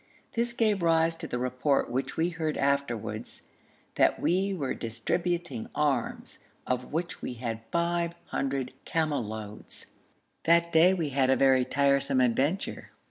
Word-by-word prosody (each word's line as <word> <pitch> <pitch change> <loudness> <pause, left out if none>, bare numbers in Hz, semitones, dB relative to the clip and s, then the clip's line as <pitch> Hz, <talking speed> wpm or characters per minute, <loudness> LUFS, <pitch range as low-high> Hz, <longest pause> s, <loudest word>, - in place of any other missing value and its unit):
This 235 0 0
gave 215 -4 +2
rise 165 0 +3
to 165 0 -6
the 125 - -3
report 125 +3 +1
which 130 +2 -2
we 165 +2 +2
heard 160 -2 -2
afterwards 140 -5 -1 0.5
'that - - +3
we 190 +3 +1
were 150 -9 -2
distributing 135 +4 -2
arms, 140 -5 -1 0.3
of 125 0 -2
which 170 +3 -3
we - - -4
had 115 -2 -4
five 170 0 0
hundred 135 -2 -2
camel 155 -5 0
loads.' 105 -1 -7 0.5
That 170 +1 +4
day 175 +4 +6
we 165 -5 -1
had 135 -1 +2
a 130 - +5
very 130 -2 +4
tiresome 140 -1 +2
adventure. 135 +9 0
140 Hz, 140 wpm, -28 LUFS, 125-170 Hz, 0.5 s, day